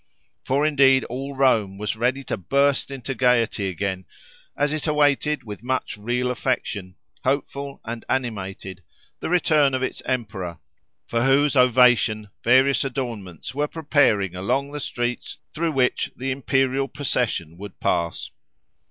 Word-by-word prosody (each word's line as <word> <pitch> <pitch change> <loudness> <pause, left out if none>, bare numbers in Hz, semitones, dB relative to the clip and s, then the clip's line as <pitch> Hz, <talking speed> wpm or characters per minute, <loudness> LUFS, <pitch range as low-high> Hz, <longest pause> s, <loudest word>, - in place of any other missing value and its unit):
For 140 +3 +1
indeed 135 -3 +5
all 135 +3 -5
Rome 110 -8 +2
was 105 +2 -2
ready 125 +4 0
to - - -3
burst 140 +9 +1
into 135 -1 -5
gaiety 115 -5 +2
again, 95 0 -3 0.5
as 145 +1 +1
it 155 +1 -3
awaited 150 0 +2
with 105 -3 -8
much 130 +1 -2
real 120 +4 -1
affection, 110 -7 -2 0.3
hopeful 140 +1 -2
and 115 0 -5
animated, 95 -6 -3 0.4
the - - -4
return 155 -6 +3
of 130 - -1
its - - -3
emperor, 100 -9 -3 0.5
for 115 0 0
whose 140 +2 +3
ovation 125 -4 +4
various 130 +3 +4
adornments 120 - -5
were 145 +2 0
preparing 145 - +2
along 135 +10 -1
the 150 - -5
streets 120 -3 -3 0.2
through 165 0 -1
which 130 -2 +1
the 135 +2 -2
imperial 135 0 +1
procession 120 - -2
would 100 -1 -9
pass. 85 -1 -1
125 Hz, 135 wpm, -23 LUFS, 105-140 Hz, 0.5 s, indeed